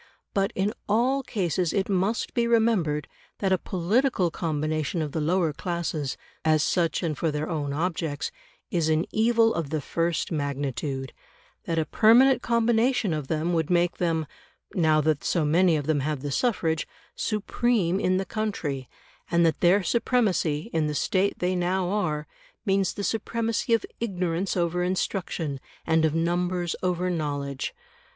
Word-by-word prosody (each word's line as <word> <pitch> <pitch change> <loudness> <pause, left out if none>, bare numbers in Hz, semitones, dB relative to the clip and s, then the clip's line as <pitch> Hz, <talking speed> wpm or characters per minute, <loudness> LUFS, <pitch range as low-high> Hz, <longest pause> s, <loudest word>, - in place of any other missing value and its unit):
But 195 +2 +1
in 200 +3 0 0.2
all 250 +6 +2
cases 180 - -1
it 195 -1 0
must 195 +3 0
be 235 -2 +1
remembered 215 -11 +2 0.3
that 195 -2 0
a 190 - +3
political 190 +1 +1
combination 155 +1 -1
of 155 -2 -2
the 160 - -2
lower 165 0 +1
classes, 155 -4 -3 0.3
as 155 -1 +3
such 170 0 +1
and 160 -3 -1
for 165 - 0
their 150 +1 -2
own 150 -4 -2
objects, 160 - -2 0.4
is 170 -5 +1
an 155 +1 +2
evil 225 0 +3
of 165 -4 -3
the 155 +1 -1
first 165 +5 -1
magnitude; 140 -2 -3 0.5
that 165 - -1
a 160 - +2
permanent 245 - +5
combination 235 -2 +2
of 150 -3 -3
them 160 +3 0
would 160 -2 0
make 175 0 +2
them 165 -3 0 0.5
(now 155 -3 +3
that 155 -1 +1
so 165 -4 +1
many 170 +3 +4
of 145 -2 -2
them 155 -1 +1
have 145 0 -2
the 145 - -3
suffrage) 165 - 0 0.3
supreme 210 -3 0
in 185 -1 +2
the 190 - -1
country; 170 - -3 0.4
and 170 0 +3
that 160 - +1
their 185 +3 +4
supremacy, 210 -7 +1
in 160 -2 +1
the 150 - -2
state 190 +7 +1
they 180 +1 0
now 180 +1 0
are, 155 -8 -1 0.4
means 195 -1 +2
the 200 - -4
supremacy 230 +2 -1
of 225 - -2
ignorance 185 -4 -1
over 175 0 0
instruction 180 -5 -2 0.3
and 160 -1 +3
of 155 0 +1
numbers 175 +1 0
over 180 0 0
knowledge. 145 -4 -3
175 Hz, 160 wpm, -26 LUFS, 155-200 Hz, 0.5 s, permanent